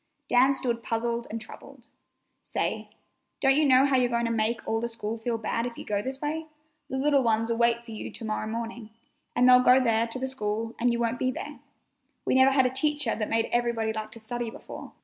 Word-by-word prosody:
Dan 260 +3 +4
stood 235 -3 -2
puzzled 235 +1 -2
and 225 - -4
troubled. 215 - -12 0.6
"Say, - - -3 0.5
don't 270 -1 +4
you 305 +1 +3
know 260 0 +6
how 275 -2 +3
you're 250 -1 +2
going 235 0 0
to 230 - -1
make 230 +1 -1
all 225 0 0
the 235 - -2
school 225 -1 -4
feel 230 +1 -2
bad 230 +2 -2
if 235 - -9
you - - -8
go 205 -1 -1
this 265 +4 -5
way? 315 +2 -3 0.4
The 265 - -3
little 280 0 +3
ones'll 225 -1 +1
wait 235 0 +2
for 230 - -10
you 215 - -6
to 230 - -8
morrow 215 0 -2
morning, 230 0 -5 0.5
and 250 - +4
they'll 250 0 +8
go 255 +1 +7
there 230 -2 +2
to 230 - -4
the 260 - -3
school 225 -3 -3
and 245 +1 +2
you 235 - 0
won't 235 +1 -1
be 255 - +1
there. 290 +3 -6 0.7
We - - +1
never 260 +1 +6
had 265 -1 +3
a 255 - +1
teacher 295 -2 +1
that 215 -1 -3
made 225 0 +1
everybody 235 -2 0
like 215 0 -4
to 230 - -9
study 235 +1 -4
before. - - -10
235 Hz, 225 wpm, -27 LUFS, 225-260 Hz, 0.7 s, they'll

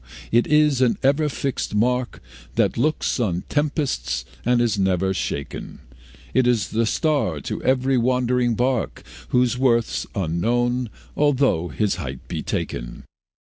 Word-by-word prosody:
it 120 +1 +3
is 150 -3 +3
an 125 -2 +3
ever 145 +3 +3
fixed 135 -6 -3
mark, 125 +3 0 0.3
That - - +2
looks 150 +2 0
on 90 -7 0
tempests 130 - -1 0.2
and 120 0 +3
is 115 -4 +1
never 95 0 +1
shaken; 70 -6 -4 0.6
It 130 - +3
is 115 -5 +2
the 115 +1 +1
star 140 - 0
to - - -4
every 130 0 +2
wandering 125 -1 +1
bark, 125 +1 -1 0.2
Whose 125 0 +2
worth's 120 -3 +1
unknown, 120 +8 0 0.3
although 135 - +2
his 100 +5 -1
height 65 -1 -6
be - - -3
taken. - - -4
120 Hz, 135 wpm, -22 LUFS, 95-130 Hz, 0.6 s, it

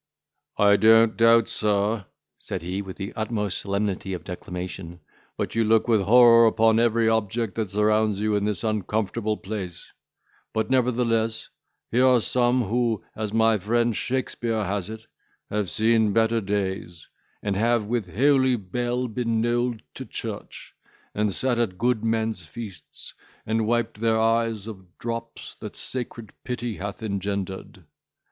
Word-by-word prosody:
"I 100 0 +5
don't 110 +1 +5
doubt, 115 0 +5
sir," 105 -1 0 0.3
said - - -5
he, 90 +3 -3
with 95 -2 -8
the 100 0 -5
utmost 105 -3 -2
solemnity 100 -1 -2
of 90 - -5
declamation, 90 -1 -7 0.4
"but - - -3
you 115 - +2
look 110 +1 +3
with 110 -3 +3
horror 115 +2 +7
upon 110 0 +3
every 115 -1 +2
object 110 -1 0
that 110 -4 -2
surrounds 105 0 +2
you 105 0 +1
in 100 - 0
this 105 -4 -1
uncomfortable 110 0 -1
place; 95 -4 -7 0.6
but, 110 +2 -1
nevertheless, 115 -3 +1 0.4
here 125 +3 +4
are 125 -1 +5
some, 125 +2 +1
who, 115 0 0
as 110 -2 -3
my 110 -1 +3
friend 115 +3 +1
Shakespeare 120 -3 -2
has 100 0 -3
it, 110 0 -8 0.5
have 105 -3 -1
seen 110 +3 +2
better 115 +1 +2
days, 95 -4 -3 0.4
and 100 -1 -1
have 115 +1 +2
with 110 -5 -2
holy 130 +1 +4
bell 120 +5 -2
been 115 0 -1
knolled 120 0 0
to - - -7
church; - - -7 0.4
and 105 0 0
sat 125 +4 0
at 100 -6 -1
good 120 0 +1
men's 110 -4 -1
feasts, 100 +4 -9 0.3
and 110 0 0
wiped 115 -2 -1
their 115 -1 +2
eyes 115 -2 +1
of 95 -5 -11
drops 115 0 -6
that - - -8
sacred 120 -4 -5
pity 120 -3 -4
hath 100 +3 -6
engendered. 100 -3 -4
110 Hz, 145 wpm, -25 LUFS, 100-115 Hz, 0.6 s, horror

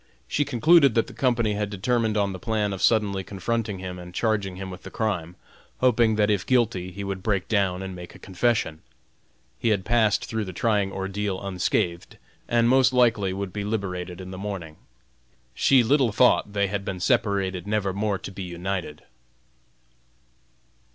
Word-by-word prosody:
She 145 - 0
concluded 140 +1 +5
that 115 - +3
the - - -12
Company 120 -5 +1
had 105 0 -2
determined 110 +2 0
on 100 -1 +1
the 95 - -7
plan 105 -2 -1
of 95 - -6
suddenly 100 -4 +2
confronting 105 +2 -3
him 90 -1 -6
and 90 0 -11
charging 105 -5 0
him 95 0 -6
with 90 - -9
the - - -9
crime, 90 -7 -2 0.4
hoping 120 -3 +3
that 105 0 +2
if 100 -3 +1
guilty 115 -8 +1
he 100 +2 -6
would 95 -1 -4
break 100 -3 -1
down 95 -3 +1
and 95 -1 -6
make 90 -1 -10
a - - -10
confession. 95 -5 -1 0.8
He - - +1
had 100 -4 +1
passed 110 -3 +2
through 110 -2 -3
the 95 - -7
trying 100 0 +1
ordeal 95 0 -3
unscathed 90 -2 -2 0.3
and 115 0 +3
most 130 +1 +4
likely 115 -6 +3
would 95 -1 -4
be 105 - -3
liberated 90 -4 -3
in 95 0 -8
the 95 - -7
morning. 95 -6 -6 0.8
She 130 - +4
little 130 0 +3
thought 105 -2 +3
they 100 -1 +2
had 100 0 -3
been 95 -2 -4
separated 100 -4 0
never 105 -2 0
more 100 0 -1
to 95 - -8
be 95 - -8
united. 90 -3 -4
100 Hz, 175 wpm, -25 LUFS, 95-115 Hz, 0.8 s, concluded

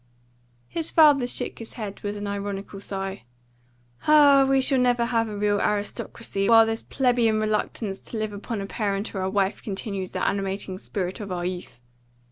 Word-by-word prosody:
His 330 -1 -3
father 290 -6 +5
shook - - -3
his 230 - -6
head 210 -4 -6
with 205 0 -4
an 205 - -5
ironical 200 0 -4
sigh. 195 0 -5 0.9
"Ah, 285 -3 +7
we 270 0 +4
shall 265 0 +3
never 245 -1 +3
have 230 -2 0
a 210 - -5
real 205 0 +1
aristocracy 205 0 -2
while 225 -1 +8
this 225 0 -2
plebeian 240 -4 +1
reluctance 215 -1 -2
to 230 - -7
live 215 -1 -2
upon 205 +1 -4
a - - -4
parent 200 0 -2
or 190 - -3
a 190 - -1
wife 195 0 0
continues 195 -2 -4
the - - -2
animating 195 -1 -2
spirit 190 -3 -4
of 200 -3 -6
our 175 -1 -2
youth. 180 -8 -5
210 Hz, 175 wpm, -25 LUFS, 195-235 Hz, 0.9 s, while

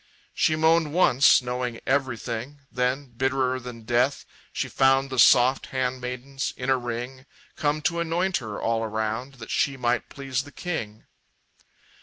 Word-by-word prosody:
She 155 - +2
moaned 160 -1 +3
once, 140 -7 +5
knowing 125 -1 -3
everything; 130 0 -2
Then, 125 +2 -1
bitterer 130 0 0
than 120 -2 -9
death, 120 +5 +1 0.3
she - - -2
found 135 0 +2
The 130 - -2
soft 125 +4 +5
handmaidens, 130 +1 -3
in 130 +1 -1
a - - +5
ring, 125 +3 -6 0.3
Come 150 0 -1
to 170 +3 0
anoint 175 +3 0
her, 110 -5 -6
all 115 0 0
around, 110 +4 -3
That 115 -3 -9
she 135 -1 +1
might 120 -2 0
please 135 -2 -3
the 145 +1 -13
king. 110 - -5
130 Hz, 145 wpm, -25 LUFS, 120-140 Hz, 0.3 s, once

